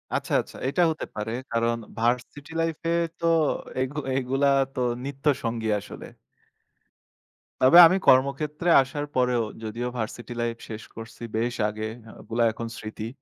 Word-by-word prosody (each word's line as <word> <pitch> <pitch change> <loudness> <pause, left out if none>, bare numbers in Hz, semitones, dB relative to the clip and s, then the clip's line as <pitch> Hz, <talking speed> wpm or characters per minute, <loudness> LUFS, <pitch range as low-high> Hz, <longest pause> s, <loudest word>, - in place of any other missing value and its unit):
আচ্ছা, - - -2
আচ্ছা, - - -13
এটা 175 - +1
হতে 155 - -5
পারে। 105 +1 -3 0.2
কারণ 115 0 +1 0.2
ভার্সিটি 125 +6 -1
লাইফে 165 0 -2 0.3
তো - - -3 0.6
এগু 130 +3 -3 0.2
এগুলা 135 +2 +1 0.3
তো - - -5 0.2
নিত্যসঙ্গী 130 -5 -1
আসলে। - - -10 1.6
তবে 130 +7 +7
আমি 185 - +2
কর্মক্ষেত্রে 150 +5 +3
আসার 145 +3 -4
পরেও 125 -2 +2 0.2
যদিও 115 +3 -3
ভার্সিটি 120 +1 -5
লাইফ 115 -1 -2
শেষ 110 0 -6
করছি 115 +1 -10
বেশ 120 +2 -1
আগে 110 +1 -4 0.3
ওগুলা 115 +1 -1
এখন 115 +1 -6
স্মৃতি। 110 0 -6
125 Hz, 130 wpm, -25 LUFS, 115-140 Hz, 1.6 s, তবে